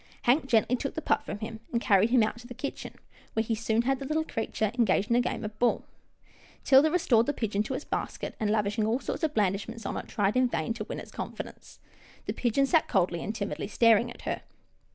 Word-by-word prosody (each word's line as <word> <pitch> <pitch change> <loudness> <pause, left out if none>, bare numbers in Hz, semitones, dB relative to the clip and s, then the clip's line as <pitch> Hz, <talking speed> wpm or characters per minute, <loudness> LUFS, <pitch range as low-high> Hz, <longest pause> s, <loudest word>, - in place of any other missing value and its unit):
Hank 265 +4 +3
gently 235 0 +3
took 275 +2 -4
the 315 - -3
pup 290 - +1
from - - -4
him, 220 +1 -6
and 235 - +1
carried 210 -2 +4
him 240 -2 +5
out 215 +2 -2
to 240 - -12
the 245 - -9
kitchen, 275 +3 -6 0.4
where 220 - +1
he 225 - -1
soon 225 +1 +1
had 270 +1 +1
the 275 - -5
little 310 +3 0
creature 220 -5 -2
engaged 215 -3 +2
in - - +5
a 245 - +4
game 235 -2 -3
of 215 0 -7
ball. 245 - +2 0.8
'Tilda 275 +3 +6
Jane 310 - -2
restored 240 -10 +3
the 290 - +1
pigeon 210 -5 -1
to 240 +5 -3
its 295 - -5
basket, - - -4
and, 215 - 0
lavishing 210 0 +1
all 230 +3 +1
sorts - - -4
of 310 -1 0
blandishments 210 +2 -1
on - - -3
it, - - -6
tried 205 -1 0
in 255 0 +4
vain 170 -1 -2
to 225 -2 -5
win - - -5
its - - -10
confidence. - - -8 0.5
The - - -2
pigeon 250 +3 +1
sat 320 +3 +3
coldly 175 -3 +1
and 215 - -4
timidly 200 -1 -3
staring 230 +2 +4
at 240 - -11
her. - - -3
230 Hz, 235 wpm, -28 LUFS, 215-255 Hz, 0.8 s, Tilda